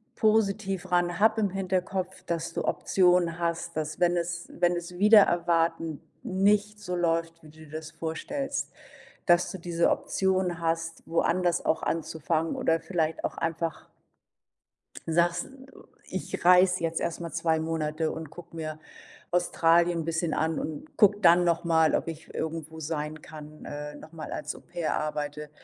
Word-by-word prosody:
positiv 195 Hz, -4 st, +1 dB
ran, 175 Hz, 0 st, +1 dB
hab 220 Hz, +1 st, +4 dB
im 205 Hz, -2 st, +2 dB
Hinterkopf, 185 Hz, 0 st, -2 dB
dass 165 Hz, -1 st, -3 dB
du -, -, -2 dB
Optionen 180 Hz, -2 st, +2 dB
hast, 170 Hz, 0 st, -2 dB
dass, 155 Hz, +2 st, -3 dB
wenn 175 Hz, 0 st, +3 dB
es 170 Hz, 0 st, -3 dB
wenn 175 Hz, 0 st, +2 dB
es 175 Hz, +1 st, -6 dB
wider 210 Hz, 0 st, +8 dB
Erwarten 165 Hz, -3 st, +1 dB, 0.2 s
nicht 205 Hz, +2 st, +1 dB
so 180 Hz, -3 st, -4 dB
läuft, 165 Hz, -1 st, 0 dB
wie 155 Hz, -, -15 dB
du 155 Hz, +1 st, -14 dB
dir 145 Hz, -, -17 dB
das 155 Hz, 0 st, -6 dB
vorstellst, 275 Hz, -, -4 dB, 0.6 s
dass 175 Hz, 0 st, +4 dB
du 190 Hz, -, -6 dB
diese 170 Hz, 0 st, +1 dB
Option 185 Hz, -2 st, 0 dB
hast, 165 Hz, 0 st, -2 dB
woanders 170 Hz, +1 st, +1 dB
auch 160 Hz, -, +1 dB
anzufangen 160 Hz, 0 st, -1 dB
oder 165 Hz, 0 st, +1 dB
vielleicht 165 Hz, -3 st, -2 dB
auch -, -, -2 dB
einfach 165 Hz, 0 st, -3 dB, 1.2 s
sagst: 170 Hz, +1 st, +2 dB, 0.6 s
„Ich -, -, -4 dB
reise 180 Hz, 0 st, +6 dB
jetzt 165 Hz, 0 st, 0 dB
erst 170 Hz, +1 st, -3 dB
mal 170 Hz, -, -5 dB
2 165 Hz, -1 st, +1 dB
Monate 160 Hz, 0 st, -1 dB
und 160 Hz, -2 st, -6 dB
gucke 170 Hz, 0 st, -12 dB
mir 155 Hz, -1 st, -5 dB, 0.5 s
Australien 170 Hz, -1 st, +3 dB
'n 160 Hz, -, -3 dB
bisschen 165 Hz, 0 st, -1 dB
an 160 Hz, 0 st, 0 dB
und 155 Hz, 0 st, -6 dB
gucke 205 Hz, 0 st, +5 dB
dann 175 Hz, -2 st, +6 dB
noch 170 Hz, -1 st, +1 dB
mal, 160 Hz, -1 st, +3 dB
ob -, -, -1 dB
ich 160 Hz, -1 st, -8 dB
irgendwo 160 Hz, 0 st, -4 dB
sein 155 Hz, 0 st, -4 dB
kann, 155 Hz, -1 st, -11 dB
äh, 150 Hz, 0 st, -6 dB
noch 155 Hz, +2 st, -13 dB
mal 155 Hz, -2 st, -7 dB
als 150 Hz, 0 st, -4 dB
Au-pair 165 Hz, -3 st, -3 dB
arbeite.” 150 Hz, 0 st, -4 dB
170 Hz, 155 wpm, -28 LUFS, 160-180 Hz, 1.2 s, wider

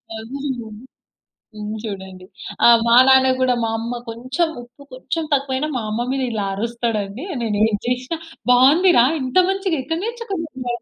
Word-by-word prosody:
అవును 265 Hz, +6 st, -6 dB
గాని 220 Hz, +2 st, -10 dB, 0.7 s
తిని 215 Hz, 0 st, -6 dB
జూడండి. 190 Hz, -3 st, -7 dB, 0.4 s
ఆ! -, -, +9 dB, 0.2 s
మా 235 Hz, +1 st, +5 dB
నాన్న 265 Hz, 0 st, +6 dB
గూడా 255 Hz, -1 st, +3 dB
మా 225 Hz, -, -1 dB
అమ్మ 235 Hz, +2 st, -4 dB
కొంచుం, 255 Hz, +9 st, -2 dB
ఉప్పు 245 Hz, +4 st, -17 dB
కొంచుం 320 Hz, +6 st, -4 dB
తక్కువైనా 275 Hz, +1 st, 0 dB
మా 240 Hz, -, -2 dB
అమ్మ 215 Hz, +2 st, -2 dB
మీద 270 Hz, -1 st, -1 dB
ఇలా 210 Hz, -3 st, -2 dB
అరుస్తాడండి. 230 Hz, -, -3 dB, 0.2 s
నేనేది 215 Hz, -1 st, +1 dB
జేషినా, 250 Hz, +6 st, -2 dB, 0.3 s
"బావుంది 280 Hz, +9 st, +5 dB
రా. 235 Hz, -, +7 dB, 0.2 s
ఇంత 255 Hz, +3 st, -5 dB
మంచిగ 385 Hz, -3 st, -1 dB
ఎక్కడ 325 Hz, +5 st, -3 dB
నేర్చుకున్నావు?" 330 Hz, -, -5 dB
250 Hz, 150 wpm, -20 LUFS, 225-280 Hz, 0.7 s, ఆ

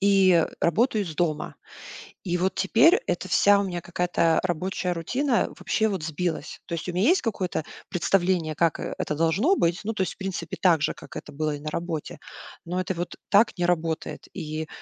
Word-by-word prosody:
И, 195 Hz, -1 st, +5 dB
э, 165 Hz, -2 st, +4 dB
работаю 215 Hz, -, +2 dB
из 165 Hz, -4 st, -7 dB
дома. 160 Hz, -2 st, -1 dB, 0.7 s
И 175 Hz, -2 st, -1 dB
вот 185 Hz, +2 st, 0 dB
теперь 230 Hz, -, +5 dB
эта -, -, -2 dB
вся 205 Hz, 0 st, +5 dB
у -, -, +1 dB
меня 175 Hz, -3 st, -4 dB
какая-то 175 Hz, -2 st, +1 dB
рабочая 180 Hz, +1 st, -1 dB
рутина 245 Hz, -, 0 dB
вообще 220 Hz, -, 0 dB
вот 190 Hz, -6 st, -3 dB
сбилась. 160 Hz, -1 st, -3 dB
То -, -, -5 dB
есть 165 Hz, -, -6 dB
у -, -, -3 dB
меня 185 Hz, +5 st, +2 dB
есть 360 Hz, +4 st, +4 dB
какое-то 190 Hz, -, -2 dB, 0.3 s
представление, 175 Hz, -3 st, +1 dB
как, 165 Hz, -1 st, +1 dB
э, -, -, -4 dB
это 150 Hz, -, -2 dB
должно 170 Hz, -, +2 dB
быть. 170 Hz, -, +1 dB
Ну, 220 Hz, +2 st, -2 dB
то 210 Hz, -, -2 dB
есть, -, -, -3 dB
в -, -, -26 dB
принципе, 195 Hz, -2 st, -4 dB
так 170 Hz, -5 st, +4 dB
же, -, -, +1 dB
как -, -, -13 dB
это -, -, -7 dB
было 150 Hz, +1 st, -2 dB
и -, -, -8 dB
на 155 Hz, +1 st, -5 dB
работе. 170 Hz, -2 st, -4 dB, 0.5 s
Но 180 Hz, +2 st, -2 dB
это 185 Hz, +1 st, -1 dB
вот 175 Hz, 0 st, -5 dB
так 210 Hz, +1 st, +4 dB
не 175 Hz, -, +1 dB
работает, 165 Hz, -2 st, -2 dB
и, 155 Hz, +1 st, -4 dB
180 Hz, 205 wpm, -25 LUFS, 165-195 Hz, 0.7 s, И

